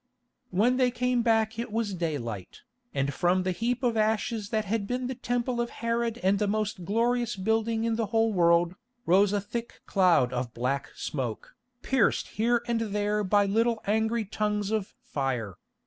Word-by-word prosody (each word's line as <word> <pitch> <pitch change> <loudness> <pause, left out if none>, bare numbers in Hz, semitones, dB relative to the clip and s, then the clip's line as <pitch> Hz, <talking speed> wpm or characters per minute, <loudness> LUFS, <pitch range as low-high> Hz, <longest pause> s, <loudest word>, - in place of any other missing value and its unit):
When 225 +7 +2
they 255 -1 +4
came 250 0 0
back 225 -1 +1
it 235 -1 -4
was 220 -2 -1
daylight, 125 - -4 0.3
and 140 +1 -1
from 180 +4 +2
the 185 - 0
heap 240 +6 -1
of 240 -2 +2
ashes 215 -1 0
that 215 -1 0
had 205 0 -1
been 250 +2 -2
the 260 - -2
Temple 245 0 -1
of 235 - -2
Herod 230 0 -1
and 195 +1 +3
the 210 - +1
most 210 -3 -2
glorious 235 +3 +1
building 220 +3 0
in 230 -1 0
the 225 -2 0
whole 225 0 +2
world, 170 -1 +4 0.3
rose 195 +3 +4
a 205 - +1
thick 230 +4 -6
cloud 175 -10 +3
of 125 -1 -3
black 130 +3 -1
smoke, 125 -6 -4 0.3
pierced 265 -6 +2
here 235 +2 +1
and 235 -1 0
there 210 -1 0
by 205 +1 +3
little 225 +3 +1
angry 220 +2 +1
tongues 210 0 -1
of 215 -3 -2
fire. 125 -8 -2
215 Hz, 175 wpm, -28 LUFS, 185-230 Hz, 0.3 s, they